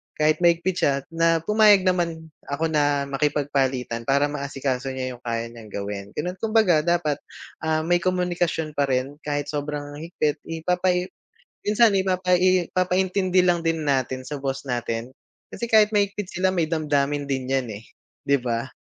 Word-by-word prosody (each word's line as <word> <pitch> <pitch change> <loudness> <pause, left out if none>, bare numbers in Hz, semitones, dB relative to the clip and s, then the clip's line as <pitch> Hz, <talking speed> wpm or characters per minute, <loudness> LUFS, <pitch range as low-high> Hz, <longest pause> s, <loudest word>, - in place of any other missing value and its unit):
kahit 155 0 +2
mahigpit 175 +1 +2
siya 140 -1 +2
na 165 0 +2
pumayag 210 -1 +5
naman 170 -3 -1 0.2
ako 160 +3 -1
na 145 -2 +2
makipagpalitan 135 -4 -1
para 140 +1 +3
maasikaso 135 -2 -3
niya 130 -1 -4
yung - - -30
kaya 115 0 -2
niyang 115 -2 -12
gawin, 100 0 -4
gano'n 180 +5 -3
kumbaga 215 -7 +3
dapat, 165 -4 +1 0.5
ah, 155 0 +1
may 175 +1 +2
komunikasyon 175 -3 -1
pa 140 - +3
rin 135 +2 -1
kahit 145 0 -2
sobrang 145 0 -4
higpit 155 -2 -2
ipapai 180 +2 0 0.6
minsan 215 +1 +5
ipapai 185 -1 +2
ipapaintindi 185 0 +2
lang 175 -1 +3
din 165 -1 0
natin 130 -1 0
sa 145 -2 -5
boss 135 0 -3
natin 120 0 -3 0.4
kasi 235 - -4
kahit 215 -1 +6
mahigpit 200 -1 0
sila 185 +1 +1
may 170 -3 +1
damdamin 145 -3 0
din 130 -1 -2
yan, 130 -2 +1
eh, 105 +2 -8 0.4
di 140 0 +3
ba? 120 0 -2
155 Hz, 155 wpm, -24 LUFS, 135-180 Hz, 0.6 s, kahit